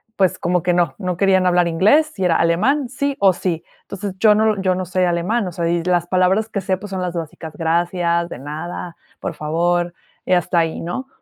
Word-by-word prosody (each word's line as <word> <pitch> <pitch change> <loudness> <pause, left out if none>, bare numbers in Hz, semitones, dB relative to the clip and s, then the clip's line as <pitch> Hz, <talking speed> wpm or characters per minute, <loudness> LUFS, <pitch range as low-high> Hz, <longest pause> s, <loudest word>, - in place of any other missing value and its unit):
pues, 190 -4 +1
como 175 -1 0
que 180 - +2
no, 175 -1 +1
no 180 -3 -2
querían 190 -1 +3
hablar 175 -1 +3
inglés, 250 - +3
y 185 - +1
era 170 -2 +3
alemán, 245 - +1
sí, 280 +1 -2
o 195 -2 +5
sí. 175 -2 -3 0.2
Entonces 200 -1 -6
yo 215 0 +5
no 215 -1 +2
yo 185 -1 +1
no 185 0 -3
se 185 +1 0
alemán, 180 +6 0
o - - -4
sea, 170 0 -2
y 170 0 0
las 175 -1 +1
palabras 185 +4 +2
que 200 - -3
sé, 190 -1 -1
pues 205 +2 -9
son 190 -1 -3
las 180 -1 -2
básicas, 160 -1 -6
gracias, 170 +1 0
de - - -7
nada, 160 +4 -6 0.2
por - - -4
favor, 175 +3 0 0.3
y 185 - +1
hasta 175 -1 +2
ahí, 165 -1 -1
¿no? 220 +11 -4
180 Hz, 220 wpm, -20 LUFS, 170-195 Hz, 0.3 s, o